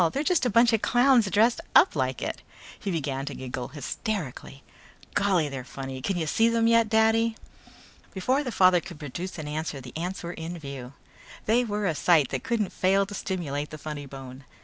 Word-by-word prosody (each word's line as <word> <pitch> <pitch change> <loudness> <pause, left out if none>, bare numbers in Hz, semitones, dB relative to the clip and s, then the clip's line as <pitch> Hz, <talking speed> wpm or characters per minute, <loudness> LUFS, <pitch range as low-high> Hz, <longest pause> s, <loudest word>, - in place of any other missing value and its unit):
They're 280 - -1
just 330 -5 +2
a - - +1
bunch 230 +2 +5
of 220 - +2
clowns 245 -4 +4
dressed 225 +5 +3
up - - +6
like 130 -3 -1
it." - - -4 0.4
He 200 - -4
began 140 -6 -2
to 145 - -4
giggle 125 -1 -5
hysterically. 145 - -5 0.5
"Golly, 185 -6 +2
they're 135 -3 -5
funny. 135 0 -7
Can 190 +7 -1
you 165 - -1
see 225 +8 +3
them 230 0 +2
yet, 230 -1 +4
Daddy?" 225 +1 +3 0.8
Before 255 +10 0
the 250 - -4
father 185 -3 +5
could 175 -3 -10
produce 170 +6 -6
an 155 -2 -6
answer 150 -1 -3
the 125 -2 -11
ants 175 +4 -4
were 170 +1 -5
in 165 +2 -6
view. 140 -4 -8 0.5
They 235 +3 +3
were 210 -2 -2
a 170 - +1
sight 155 -3 +3
that - - -3
couldn't 235 -6 -1
fail 195 +2 +2
to 200 - -9
stimulate 150 -7 -3
the 155 - -8
funny 150 -1 -6
bone. 135 0 -10
175 Hz, 195 wpm, -26 LUFS, 140-220 Hz, 0.8 s, up